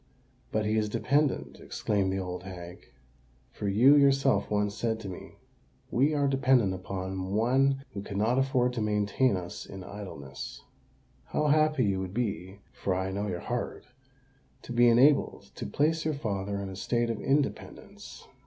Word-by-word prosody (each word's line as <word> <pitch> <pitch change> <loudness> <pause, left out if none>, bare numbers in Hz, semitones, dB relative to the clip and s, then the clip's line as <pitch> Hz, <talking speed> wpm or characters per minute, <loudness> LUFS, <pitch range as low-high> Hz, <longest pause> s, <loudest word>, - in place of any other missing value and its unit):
"But 110 0 0
he 110 +1 +1
is 105 -1 +1
dependant," 125 - 0
exclaimed 100 -2 -1
the 95 - -1
old 90 -1 -4
hag: 90 -2 -10 0.6
"for 105 - -5
you 120 +9 +6
yourself 135 -6 +3
once 105 -1 0
said 110 0 -1
to 100 - -7
me, 90 - -9 0.6
'We 140 +5 +2
are 145 -1 +2
dependant 130 -7 +3
upon 95 0 -4
one 135 +4 +2
who 100 - -4
cannot 110 +6 0
afford 130 -2 +1
to 120 - -2
maintain 105 +2 +1
us 90 -1 -6
in 95 -1 -8
idleness.' 95 -9 -8 0.6
How 150 0 0
happy 150 -9 +3
would 95 0 -2
you 100 -5 -3
be—for 95 - -3
I 95 +1 -2
know 100 +2 -2
your 90 -3 -3
heart—to 130 0 -8
be 120 0 +5
enabled 135 +5 +3
to - - -6
place 160 +2 +1
your 155 -1 -1
father 100 -6 -3
in 100 -1 -5
a 95 - -7
state 120 +4 0
of 115 - -5
independence!" 140 +1 -3
110 Hz, 155 wpm, -29 LUFS, 95-135 Hz, 0.6 s, you